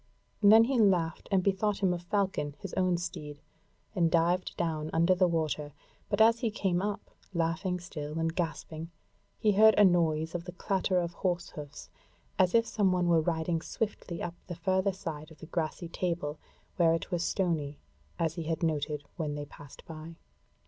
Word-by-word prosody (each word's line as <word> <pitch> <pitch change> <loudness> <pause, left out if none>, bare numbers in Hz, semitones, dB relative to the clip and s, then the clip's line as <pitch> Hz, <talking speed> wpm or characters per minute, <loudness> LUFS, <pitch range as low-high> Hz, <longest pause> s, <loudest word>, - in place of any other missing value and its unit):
Then 215 +2 +8
he 250 +1 +1
laughed 180 -6 +2
and 190 -2 +3
bethought 200 +1 0
him 185 -2 +4
of 175 - -4
Falcon 175 -6 -1
his 195 -3 -8
own 185 -2 +2
steed, 160 -4 -6 0.5
and 175 -5 +2
dived 170 +2 +1
down 155 -3 -1
under 170 +3 +4
the 185 0 +3
water; 155 -3 -1 0.4
but - - 0
as 225 +1 +6
he 230 - 0
came 190 -5 0
up, 205 0 -4 0.2
laughing 170 +2 0
still 155 -3 -6
and 165 0 -1
gasping, 165 -1 -4 0.5
he 215 - +3
heard 215 +2 +6
a 205 - +8
noise 165 -3 +2
of 175 -1 -4
the 180 - -7
clatter 185 0 0
of 170 -1 -2
horse 175 -1 -1
hoofs, 145 -2 -9 0.5
as 185 +1 +4
if 230 0 +5
some 205 -4 +1
one 180 -1 +1
were 165 -1 +5
riding 165 0 -1
swiftly 200 -5 -4
up 170 - -3
the 175 - -5
further 190 +3 +1
side 160 -5 -6
of 160 - -15
the - - -10
grassy 165 +1 -3
table, 165 -3 -3 0.4
where 165 -2 +4
it 165 - -5
was 175 -1 0
stony, 160 -8 -1 0.4
as 165 -2 0
he 170 - -4
had 160 +1 -2
noted 150 -2 -1
when 150 -4 -2
they 145 0 -4
passed 145 -1 -14
by. 160 +1 -9
170 Hz, 185 wpm, -30 LUFS, 160-190 Hz, 0.5 s, Then